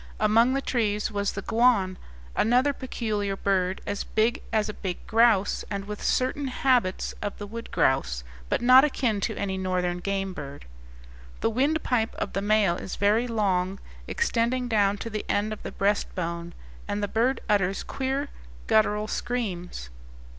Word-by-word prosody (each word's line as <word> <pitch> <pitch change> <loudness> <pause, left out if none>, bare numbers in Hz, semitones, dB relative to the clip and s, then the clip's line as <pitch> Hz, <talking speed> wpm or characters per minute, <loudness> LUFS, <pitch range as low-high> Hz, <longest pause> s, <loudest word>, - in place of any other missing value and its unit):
Among 225 +4 +4
the 275 - -1
trees 210 -4 0
was 200 -1 -1
the 200 - -5
guan, 225 -5 +3 0.4
another 250 +5 +3
peculiar 215 -7 -2
bird 190 -1 0
as 200 - -2
big 220 +2 +1
as 215 -2 +1
a 210 - -4
big 185 -4 -5
grouse, 225 -3 +3
and 200 -1 -3
with 210 0 -6
certain 270 +2 0
habits 250 -7 +1
of 205 - -4
the 205 - -6
wood 230 +3 -7
grouse, 60 - +1 0.3
but - - 0
not 255 +2 +8
akin 245 -8 0
to - - -1
any 190 -1 -2
northern 180 -1 -1
game 195 0 -2
bird. 140 -4 -8 0.8
The 225 - +2
windpipe 255 -2 +1
of - - -4
the 195 - -1
male 205 -4 +3
is - - -6
very 215 +4 +2
long, 195 -4 0 0.3
extending 250 - 0
down 205 -3 +2
to 230 - -5
the 215 0 -3
end 210 +1 +1
of 215 - -9
the - - -6
breast 200 +1 0
bone, 170 -1 -4 0.3
and 205 0 -2
the - - +1
bird 240 +6 +1
utters 195 -2 +1
queer 270 +2 -2 0.4
guttural 210 -1 +2
screams. 180 - -4
210 Hz, 160 wpm, -26 LUFS, 195-235 Hz, 0.8 s, not